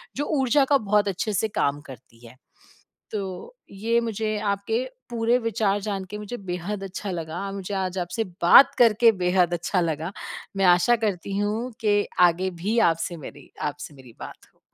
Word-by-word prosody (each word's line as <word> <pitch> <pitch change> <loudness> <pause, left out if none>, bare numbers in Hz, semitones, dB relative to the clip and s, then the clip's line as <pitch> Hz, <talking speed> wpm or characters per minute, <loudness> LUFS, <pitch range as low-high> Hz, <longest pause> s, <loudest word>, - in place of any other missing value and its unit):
जो 290 - -2
ऊर्जा 270 +2 +3
का 280 - +7
बहुत 210 -2 +1
अच्छे 200 +3 -2
से 220 - +1
काम 145 -7 -1
करती 120 -2 -14
है। 120 - -15 0.8
तो, 200 - -6 0.2
ये 225 +4 0
मुझे 220 -1 -2
आपके 220 +5 -1 0.3
पूरे 235 +1 +1
विचार 210 -3 0
जान 195 -2 -3
के 210 - -5
मुझे 210 +4 -6
बेहद 190 +2 -5
अच्छा 195 +1 -5
लगा, 175 +3 -5
मुझे 195 0 -6
आज 190 -1 -2
आपसे 180 +6 -2 0.2
बात 220 +10 +8
करके 230 0 +6
बेहद 180 -1 +2
अच्छा 180 +1 0
लगा। 165 +1 -2 0.5
मैं 195 - +2
आशा 180 +7 +5
करती 195 0 -2
हूँ 215 +5 -1
कि 205 -1 +2 0.2
आगे 185 +3 -2
भी 220 +4 0
आपसे 165 +1 -4
मेरी 145 - -12
आपसे 145 0 -5
मेरी 125 -4 -15
बात - - -8 0.2
हो। - - -36
200 Hz, 170 wpm, -24 LUFS, 175-220 Hz, 0.8 s, बात